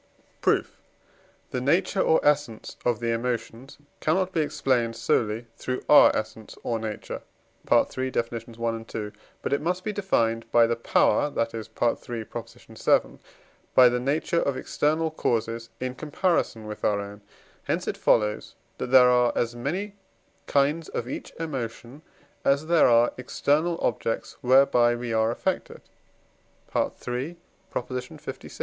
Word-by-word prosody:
Proof. -, -, 0 dB, 0.7 s
The 125 Hz, -, -2 dB
nature 185 Hz, +8 st, +2 dB
or 160 Hz, -, +4 dB
essence 145 Hz, -7 st, 0 dB
of 120 Hz, -3 st, +1 dB
the 115 Hz, 0 st, 0 dB
emotions 120 Hz, +2 st, -3 dB, 0.2 s
cannot 185 Hz, +4 st, +1 dB
be 165 Hz, -, +1 dB
explained 125 Hz, -6 st, 0 dB
solely 115 Hz, 0 st, 0 dB
through 130 Hz, 0 st, -3 dB
our 150 Hz, -, +8 dB
essence 110 Hz, 0 st, -5 dB
or 115 Hz, -2 st, -1 dB
nature 110 Hz, -1 st, -5 dB, 0.5 s
(III. 130 Hz, 0 st, +2 dB
Deff. 115 Hz, -2 st, -2 dB
i., 115 Hz, 0 st, -4 dB
ii.), 105 Hz, -1 st, -3 dB, 0.3 s
but -, -, -1 dB
it 140 Hz, -, +1 dB
must 180 Hz, +3 st, -1 dB
be 215 Hz, -, -2 dB
defined 115 Hz, -, 0 dB
by 120 Hz, -1 st, +6 dB
the 115 Hz, 0 st, 0 dB
power, 115 Hz, +5 st, +2 dB
that 115 Hz, -5 st, -2 dB
is 110 Hz, -1 st, -6 dB
(III. 120 Hz, -, +3 dB, 0.3 s
vii.), -, -, -2 dB, 0.6 s
by 125 Hz, -1 st, +8 dB
the 125 Hz, 0 st, 0 dB
nature 150 Hz, +6 st, 0 dB
of 140 Hz, -2 st, -1 dB
external 155 Hz, +2 st, 0 dB
causes 115 Hz, -5 st, -1 dB
in 130 Hz, 0 st, -3 dB
comparison 150 Hz, -, -1 dB
with 105 Hz, 0 st, -8 dB
our 105 Hz, -1 st, +2 dB
own; 100 Hz, 0 st, -8 dB, 0.4 s
hence -, -, -1 dB
it -, -, -1 dB
follows, 105 Hz, -2 st, +1 dB, 0.2 s
that -, -, -2 dB
there 125 Hz, -1 st, +7 dB
are 125 Hz, -1 st, +4 dB
as 120 Hz, 0 st, -1 dB
many 180 Hz, +12 st, -3 dB, 0.5 s
kinds 145 Hz, +3 st, +1 dB
of 120 Hz, -, -4 dB
each -, -, -6 dB
emotion 130 Hz, -3 st, -5 dB, 0.4 s
as 140 Hz, +2 st, +2 dB
there 170 Hz, 0 st, +5 dB
are 120 Hz, 0 st, +4 dB
external 155 Hz, +6 st, 0 dB
objects 115 Hz, -1 st, -2 dB
whereby 125 Hz, -2 st, +5 dB
we 120 Hz, -1 st, -4 dB
are 110 Hz, 0 st, +2 dB
affected 120 Hz, -, -3 dB, 0.9 s
(III. 125 Hz, +4 st, -2 dB, 0.5 s
lvi.) 125 Hz, 0 st, -6 dB
125 Hz, 140 wpm, -26 LUFS, 115-145 Hz, 0.9 s, our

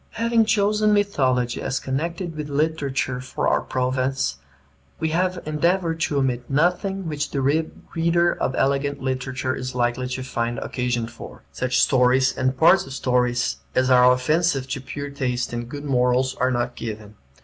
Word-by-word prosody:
Having 230 Hz, 0 st, +2 dB
chosen 210 Hz, 0 st, +2 dB
mythology 130 Hz, -12 st, +1 dB
as 135 Hz, -, -1 dB
connected 165 Hz, +5 st, -3 dB
with 150 Hz, -1 st, -5 dB
literature 140 Hz, -4 st, -1 dB
for 130 Hz, -, -3 dB
our -, -, +2 dB
province, 130 Hz, -, -1 dB, 0.6 s
we 160 Hz, -, 0 dB
have 180 Hz, +3 st, 0 dB
endeavored 165 Hz, +2 st, 0 dB
to 155 Hz, -3 st, 0 dB
omit 125 Hz, -3 st, -1 dB
nothing 180 Hz, +5 st, 0 dB
which 150 Hz, -2 st, -2 dB
the 140 Hz, -, -2 dB
reader 165 Hz, +4 st, +1 dB
of 130 Hz, -, -2 dB
elegant 140 Hz, +1 st, 0 dB
literature 130 Hz, 0 st, -2 dB
is 130 Hz, 0 st, -5 dB
likely 120 Hz, +1 st, 0 dB
to 130 Hz, 0 st, -4 dB
find 120 Hz, -2 st, -2 dB
occasion 125 Hz, -1 st, -2 dB
for. 120 Hz, -, -11 dB
Such 125 Hz, 0 st, 0 dB
stories 130 Hz, 0 st, +3 dB
and 130 Hz, 0 st, 0 dB
parts 165 Hz, +1 st, +5 dB
of 135 Hz, -, -8 dB
stories 125 Hz, -, 0 dB, 0.2 s
as 130 Hz, 0 st, +2 dB
are 125 Hz, 0 st, +7 dB
offensive 135 Hz, +2 st, +1 dB
to 140 Hz, 0 st, -3 dB
pure 145 Hz, +2 st, -6 dB
taste 125 Hz, -4 st, -2 dB
and 120 Hz, 0 st, -4 dB
good 145 Hz, +2 st, -7 dB
morals 125 Hz, -1 st, +2 dB
are 130 Hz, -1 st, 0 dB
not 120 Hz, -1 st, -1 dB
given. 110 Hz, -2 st, -7 dB
135 Hz, 160 wpm, -23 LUFS, 125-160 Hz, 0.6 s, are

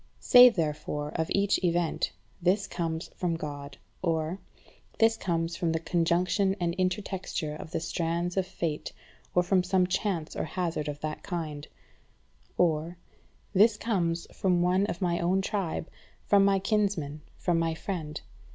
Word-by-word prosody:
Say, 250 Hz, 0 st, +9 dB
therefore, 150 Hz, -5 st, -2 dB
of 160 Hz, -1 st, -1 dB
each 200 Hz, -1 st, +2 dB
event: 170 Hz, -2 st, +1 dB, 0.3 s
"This 190 Hz, +3 st, +2 dB
comes 165 Hz, -3 st, -3 dB
from 175 Hz, -2 st, -2 dB
God:" 145 Hz, -3 st, -6 dB, 0.2 s
or 165 Hz, +1 st, -1 dB, 0.6 s
"This 225 Hz, 0 st, +4 dB
comes 170 Hz, -4 st, -1 dB
from 170 Hz, -2 st, 0 dB
the 165 Hz, -, 0 dB
conjunction 180 Hz, +4 st, +1 dB
and 170 Hz, -1 st, 0 dB
intertexture 185 Hz, -4 st, -2 dB
of 155 Hz, -, -8 dB
the -, -, -2 dB
strands 170 Hz, +1 st, -2 dB
of 190 Hz, -1 st, 0 dB
fate, 165 Hz, -5 st, -3 dB, 0.4 s
or 180 Hz, -, +5 dB
from 185 Hz, +1 st, +3 dB
some 185 Hz, 0 st, +2 dB
chance 180 Hz, -3 st, -2 dB
or -, -, -2 dB
hazard 170 Hz, -4 st, -2 dB
of 145 Hz, 0 st, -5 dB
that 155 Hz, 0 st, -4 dB
kind:" 155 Hz, -5 st, -5 dB, 0.9 s
or 165 Hz, 0 st, +1 dB, 0.6 s
"This 210 Hz, +2 st, +5 dB
comes 175 Hz, -7 st, 0 dB
from 180 Hz, -2 st, +2 dB
one 185 Hz, +3 st, +2 dB
of 180 Hz, -2 st, -3 dB
my 175 Hz, -1 st, +1 dB
own 180 Hz, +3 st, +2 dB
tribe, 190 Hz, -5 st, -2 dB, 0.4 s
from 200 Hz, -1 st, +5 dB
my 195 Hz, 0 st, +4 dB
kinsman, 195 Hz, -7 st, 0 dB, 0.2 s
from 175 Hz, -2 st, +1 dB
my 165 Hz, -1 st, 0 dB
friend. 160 Hz, -4 st, -4 dB
175 Hz, 150 wpm, -28 LUFS, 160-190 Hz, 0.9 s, Say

